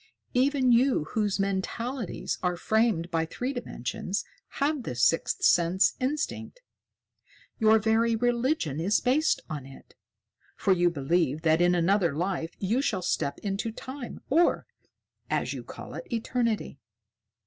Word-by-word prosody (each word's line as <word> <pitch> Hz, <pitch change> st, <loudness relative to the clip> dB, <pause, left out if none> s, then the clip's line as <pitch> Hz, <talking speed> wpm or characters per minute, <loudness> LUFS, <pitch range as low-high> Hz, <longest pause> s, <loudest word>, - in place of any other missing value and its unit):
Even 260 Hz, 0 st, +3 dB
you 245 Hz, -, +4 dB
whose 210 Hz, -3 st, 0 dB
mentalities 200 Hz, +4 st, -2 dB
are 180 Hz, -1 st, 0 dB
framed 215 Hz, -4 st, +1 dB
by 165 Hz, -1 st, +1 dB
three 250 Hz, +11 st, -4 dB
dimensions 200 Hz, -, -4 dB, 0.3 s
have 290 Hz, 0 st, 0 dB
this 125 Hz, -, -3 dB
sixth 165 Hz, -, +2 dB
sense 175 Hz, +2 st, +4 dB
instinct. 300 Hz, -, -3 dB, 1.0 s
Your 220 Hz, -1 st, +6 dB
very 225 Hz, +1 st, +2 dB
religion 240 Hz, -, 0 dB
is 195 Hz, +6 st, +2 dB
based 280 Hz, +5 st, +2 dB
on 145 Hz, -4 st, -6 dB
it, 135 Hz, -, -15 dB, 0.6 s
for 195 Hz, -, +2 dB
you 175 Hz, -1 st, +3 dB
believe 155 Hz, 0 st, 0 dB
that 160 Hz, +1 st, +3 dB
in 175 Hz, 0 st, +4 dB
another 175 Hz, -2 st, +2 dB
life 170 Hz, 0 st, -2 dB
you 220 Hz, +7 st, 0 dB
shall 195 Hz, -9 st, -1 dB
step 140 Hz, -4 st, -1 dB
into 205 Hz, +3 st, -2 dB
Time, 260 Hz, +3 st, -8 dB
or, 330 Hz, +5 st, +3 dB, 0.6 s
as -, -, -1 dB
you -, -, -6 dB
call -, -, -10 dB
it, -, -, -8 dB
eternity." 230 Hz, -, -1 dB
210 Hz, 135 wpm, -27 LUFS, 170-245 Hz, 1.0 s, Your